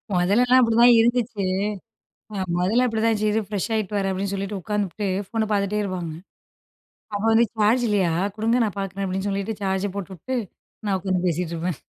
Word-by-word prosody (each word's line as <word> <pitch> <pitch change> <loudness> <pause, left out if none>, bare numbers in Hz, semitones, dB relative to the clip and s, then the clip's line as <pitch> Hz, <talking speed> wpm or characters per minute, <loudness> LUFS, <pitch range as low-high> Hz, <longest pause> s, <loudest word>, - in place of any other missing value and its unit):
மொதல்லலா 210 +8 +3
அப்படிதான் 235 0 +6
இருந்துச்சு. 235 -2 +1 0.9
அ - - -5 0.2
மொதல்ல 220 +8 +2
அப்படித்தான்யிருச்சு 220 -2 +1
இரு 220 +1 +1
ஃப்ரெஷ்ஷாயிட்டு 210 0 -2
வரேன் 195 -1 0
அப்படின்னு 195 +1 -2
சொல்லிட்டு, 195 0 -3
உட்காந்துபுட்டு 205 +1 -2 0.2
ஃபோன்ன 220 0 -1
பார்த்துட்டே 205 0 +1
இருப்பாங்க. 180 -4 -4 1.0
அப்ப 205 - -2
வந்து 225 +1 +5
சார்ஜ் 220 +4 +3
இல்லையா 195 -5 +2 0.2
கொடுங்க 225 +3 +1
நான் 205 -2 -3
பார்க்குறேன் 195 0 -4
அப்படின்னு 190 +2 -2
சொல்லிட்டு 200 +2 -2
சார்ஜ 190 0 0
போட்டுட்டு 195 +6 -5 0.5
நான் 195 -2 +1
உட்காந்து 185 -1 -1
பேசிட்ருப்பேன். 170 -1 -2
205 Hz, 145 wpm, -23 LUFS, 190-220 Hz, 1.0 s, அப்படிதான்